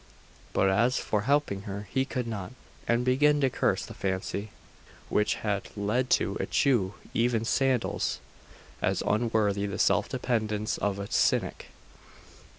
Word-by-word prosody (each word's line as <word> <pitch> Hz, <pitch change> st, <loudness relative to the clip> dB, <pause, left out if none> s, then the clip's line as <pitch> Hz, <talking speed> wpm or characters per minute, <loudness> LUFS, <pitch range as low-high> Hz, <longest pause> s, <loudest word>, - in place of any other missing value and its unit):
But 95 Hz, -, +3 dB
as 120 Hz, +6 st, +3 dB
for 105 Hz, -, 0 dB
helping 140 Hz, -9 st, +2 dB
her, 100 Hz, +1 st, -5 dB
he 130 Hz, +5 st, +1 dB
could 125 Hz, -3 st, -3 dB
not; 110 Hz, -1 st, -5 dB, 0.3 s
and 120 Hz, +1 st, +2 dB
began 145 Hz, +4 st, +4 dB
to 135 Hz, -2 st, +2 dB
curse -, -, 0 dB
the -, -, -9 dB
fancy 100 Hz, +2 st, -3 dB, 0.6 s
which 105 Hz, -, +2 dB
had 100 Hz, -2 st, -2 dB
led 110 Hz, +5 st, 0 dB
to -, -, -2 dB
eschew 115 Hz, -9 st, +1 dB, 0.2 s
even 115 Hz, -1 st, +1 dB
sandals 130 Hz, 0 st, +1 dB, 0.6 s
as -, -, 0 dB
unworthy 105 Hz, -2 st, +1 dB
the 100 Hz, -, -4 dB
self -, -, +2 dB
dependence 110 Hz, -3 st, -1 dB
of 100 Hz, -1 st, 0 dB
a 100 Hz, -, -4 dB
Cynic. -, -, +1 dB
110 Hz, 140 wpm, -28 LUFS, 100-125 Hz, 0.6 s, began